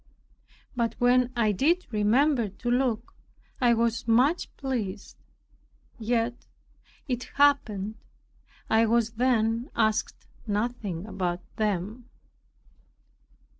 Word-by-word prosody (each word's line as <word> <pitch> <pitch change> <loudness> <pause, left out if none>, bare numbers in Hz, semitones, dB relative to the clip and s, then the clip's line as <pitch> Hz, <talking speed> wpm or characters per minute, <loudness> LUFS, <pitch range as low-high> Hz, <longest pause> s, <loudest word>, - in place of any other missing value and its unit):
But 235 -2 -1
when 250 0 +3
I 225 -3 +2
did 330 - +1
remember 235 +3 +2
to 240 +5 -4
look, 245 -3 0 0.5
I 240 -2 +4
was 230 0 0
much 255 +9 +3
pleased. 220 -7 -4 0.8
Yet 235 +1 -1 0.6
it 250 -2 -2
happened 220 -8 +2 0.7
I 225 +1 +3
was 230 0 +2
then 230 0 +1
asked 220 -1 0 0.2
nothing 205 -4 -2
about 180 -4 -3 0.2
them. 215 +3 -2
230 Hz, 95 wpm, -27 LUFS, 215-245 Hz, 0.8 s, I